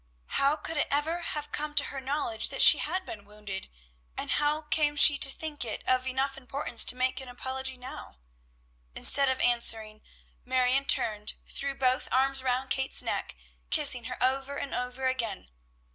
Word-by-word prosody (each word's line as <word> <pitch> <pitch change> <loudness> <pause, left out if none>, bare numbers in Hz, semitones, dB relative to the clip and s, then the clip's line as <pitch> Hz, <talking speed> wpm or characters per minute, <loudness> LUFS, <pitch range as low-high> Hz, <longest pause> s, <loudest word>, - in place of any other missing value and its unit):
How 280 +2 +3
could 325 0 -3
it - - +1
ever 305 +4 -1
have 295 -3 -5
come 295 0 -3
to - - +4
her 270 - -6
knowledge 265 -4 -2
that - - +2
she - - +8
had 375 0 -4
been 205 -2 -9
wounded, 205 -2 -8 0.5
and - - -4
how 300 +1 0
came 300 -1 0
she 285 0 +7
to 275 - +6
think 295 +1 -6
it 225 -3 -6
of 255 0 +1
enough 270 +1 -2
importance 270 -1 +2
to 250 - +4
make 255 +1 -2
an 265 - -11
apology 260 +1 -5
now. 250 - -10 0.8
Instead 275 -1 +4
of 260 0 -2
answering, 225 -3 +1 0.4
Marion 255 +1 0
turned, 210 -5 +1
threw 275 0 -3
both 255 -1 0
arms 270 +1 +2
around 260 0 -2
Kate's 265 0 +2
neck, - - -4 0.3
kissing 280 -6 +5
her 250 +1 -6
over 270 +2 -1
and 280 - -6
over 250 +1 -4
again. 235 - -3
265 Hz, 175 wpm, -28 LUFS, 250-280 Hz, 0.8 s, she